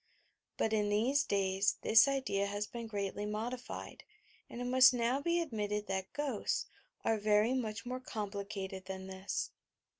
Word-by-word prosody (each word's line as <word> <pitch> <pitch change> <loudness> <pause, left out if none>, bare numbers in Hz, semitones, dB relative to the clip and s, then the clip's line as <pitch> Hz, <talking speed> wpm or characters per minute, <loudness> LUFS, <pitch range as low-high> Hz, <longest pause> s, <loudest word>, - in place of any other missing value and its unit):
But 220 - +1
in 210 -1 +2
t"hese 245 +8 +3
days 195 0 +1
this 225 +4 +7
idea 260 -8 0
has 205 +1 -2
been 235 +1 -7
greatly 205 -1 -3
modified, 240 +4 -5 0.5
and 240 - -7
it 245 - -3
must 255 0 +7
now 245 +3 +1
be 340 +3 +1
ad 335 -3 -3
mitted 210 -1 -1
that 190 -1 -3
"ghosts" 280 -7 -1 0.4
are 220 -1 +2
very 210 +3 +3
much 220 -5 -2
more 250 +1 -3
complicated 200 -4 -5
than 190 0 -5
this. 190 +1 -3
215 Hz, 155 wpm, -34 LUFS, 200-250 Hz, 0.5 s, this